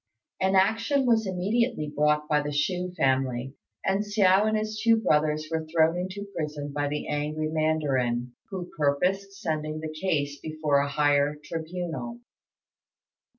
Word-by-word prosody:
An 190 +1 +2
action 225 +8 +3
was 225 -3 +3
immediately 190 - 0
brought 150 0 +2
by 150 -1 +2
the 145 0 -3
Chou 180 +5 -1
family, 130 -2 +1 0.3
and 195 +2 +2
Hsiao 205 -1 +4
and 215 0 +2
his 215 0 -3
two 230 0 +6
brothers 155 -6 +1
were 160 -1 -2
thrown 160 +1 +3
into 185 +3 -4
prison 150 -2 -4
by 145 0 0
the 150 +1 -3
angry 150 +1 -2
mandarin, 135 -6 0 0.2
who 185 -3 -6
purposed 185 +7 0
sending 155 -5 -2
the 155 0 -5
case 150 -4 -1
before 155 -2 0
a 140 0 0
higher 145 0 +2
tribunal. 175 +8 -5
155 Hz, 145 wpm, -27 LUFS, 150-190 Hz, 0.3 s, two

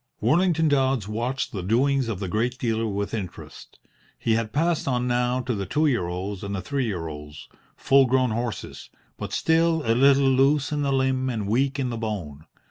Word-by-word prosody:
Worlington 165 -1 +2
Dodds 135 -6 +1
watched 120 +5 -2
the 100 - -4
doings 130 +7 +1
of 105 -5 -3
the 100 - -3
great 115 +7 -1
dealer 115 -3 -1
with 100 0 -3
interest. 100 -6 -7 0.4
He 115 - 0
had 110 -1 -1
passed 165 +4 0
on 125 -2 0
now 125 +1 +1
to 125 -1 -2
the 100 -3 -4
two 150 +10 +1
year 120 - +1
olds 95 +3 -5
and 100 0 -3
three 140 +1 -1
year 90 -6 -3
olds, 75 -1 -9 0.3
full 135 -1 +4
grown 130 -1 +2
horses, 115 -2 -5 0.3
but - - -6
still 165 0 +2
a 115 - +3
little 135 +2 +4
loose 135 +2 +3
in 150 -1 -1
the 140 -1 0
limb 130 -1 +1
and 110 -5 -3
weak 135 +6 +1
in 130 -3 -1
the 115 - -4
bone. 85 -9 -5
125 Hz, 195 wpm, -24 LUFS, 105-135 Hz, 0.4 s, full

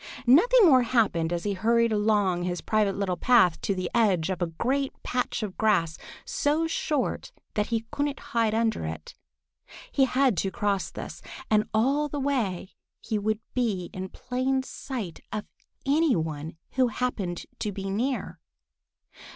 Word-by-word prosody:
Nothing 430 - +6
more 265 -7 +7
happened 215 -9 +1
as 170 -1 -2
he 205 - 0
hurried 230 +4 +2
along 205 -4 +2
his 175 0 -2
private 210 -3 +1
little 190 -3 -1
path 185 -10 +4
to 200 - 0
the 185 -1 -2
edge 195 -7 +2
of 185 - -4
a 175 - +1
great 265 +12 -1
patch 250 -2 -1
of 200 -3 -6
grass 170 -7 +2 0.3
so 300 +3 +1
short 305 -3 -1 0.2
that 210 -1 0
he 225 -1 -1
couldn't 285 0 -1
hide 230 -6 0
under 225 - +1
it. 80 0 -6 0.8
He 270 - +4
had 260 -5 +2
got - - +3
to 195 - -1
cross 200 0 -1
this, - - -8 0.3
and 215 0 +4
all 275 +7 +2
the 290 - -3
way 230 -10 -1 0.3
he 215 - -2
would 215 +1 -1
be 210 -8 -1
in 185 0 -5
plain 260 +4 -1
sight 235 - -6
of 215 - -3 0.4
any 295 +1 +3
one 160 -1 -4
who 255 -1 +3
happened 215 -7 -3
to 210 - -2
be 195 0 -5
near. 240 +2 -2
220 Hz, 160 wpm, -27 LUFS, 185-255 Hz, 0.8 s, more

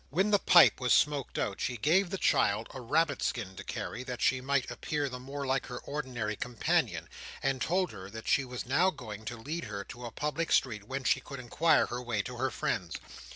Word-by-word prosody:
When 190 +8 +1
the 205 - +5
pipe - - +7
was 125 - +3
smoked 145 -3 +1
out, 100 - -2
she 125 -1 -1
gave 170 - +3
the 195 - -2
child 110 - +2
a 130 - -7
rabbit 145 +3 +1
skin 100 -6 -2
to - - -6
carry, 120 - -5
that 125 -2 -5
she 130 0 +2
might 130 -1 0
appear 145 +4 -2
the 125 -1 -6
more 140 +2 -5
like 135 0 0
her 125 - -6
ordinary 125 -7 -3
companion, 120 +2 0 0.4
and 135 -1 0
told 180 +2 +1
her 95 0 -9
that 110 +2 -9
she 140 - +3
was 125 -1 -6
now 160 +9 +3
going 110 - -8
to 120 +2 -5
lead 150 +8 -4
her 100 -2 -5
to 120 +4 -9
a - - -8
public 150 +5 -2
street 110 -6 +2
whence 130 0 -1
she - - +4
could 140 +1 -9
inquire 155 +7 +3
her 120 +1 -4
way 115 -4 -1
to 125 +2 -7
her 130 +2 0
friends. 90 -6 -2
130 Hz, 220 wpm, -31 LUFS, 120-145 Hz, 0.4 s, pipe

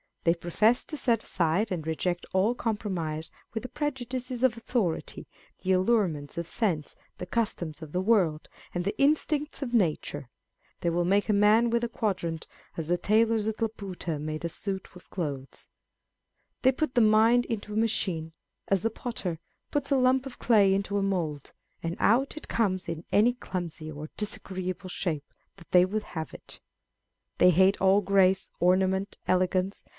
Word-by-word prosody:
They 165 - +4
profess 210 +8 +2
to 305 - -4
set 230 -5 +2
aside 180 +5 +1
and 165 -4 -3
reject 175 +2 -2
all 195 +5 +2
compromise 180 -9 -3 0.2
with 225 - -3
the 255 - -6
prejudices 255 -3 -3
of 255 -4 +4
authority, 225 -7 -2 0.4
the 190 - +1
allurements 185 -7 +1
of 170 -1 -3
sense, 170 -8 -1 0.2
the - - -5
customs 180 -6 -2
of 155 -2 -8
the 180 - 0
world, 185 -7 +2 0.3
and 175 - -1
the 200 - -3
instincts 300 +1 +1
of 245 -3 -5
nature. 150 - 0 0.5
They 170 - +1
will 175 +1 +1
make 200 +3 +2
a - - +4
man 210 +3 +5
with 235 0 +1
a 235 - -1
quadrant, 185 -8 -2 0.3
as 165 -2 -3
the 175 +1 +2
tailors 220 0 +2
at 220 0 -3
Laputa 195 -8 -3
made 155 +2 -4
a - - -1
suit 190 +3 -4
of 180 - -15
clothes. 140 -7 -5 0.9
They 260 - +5
put 270 +1 -2
the 245 - +4
mind 225 +3 +5
into 210 -2 -4
a - - -2
machine, 185 -8 0 0.3
as 195 -2 +1
the 225 - +1
potter 195 -8 -4 0.3
puts 290 -1 -1
a 275 - +5
lump 255 +1 +3
of 260 - -11
clay 205 -5 +5
into 200 +1 -1
a 200 - +1
mould, 165 -7 -2 0.3
and 165 +1 -3
out 265 +7 +2
it 305 - -8
comes 190 -5 0
in 165 0 -4
any 230 +4 +4
clumsy 175 -9 -5
or 150 +1 -7
disagreeable 185 -2 -4
shape 155 -6 -2 0.3
that 175 - -16
they 180 0 +6
would 210 +3 -2
have 160 -5 -6
it. - - -11 0.8
They 180 - +7
hate 190 +3 +4
all 195 +2 +5
grace, 190 -1 +3
orna 185 +2 +4
ment, 190 +1 -2
elegance. 185 +1 +1
195 Hz, 170 wpm, -28 LUFS, 170-225 Hz, 0.9 s, They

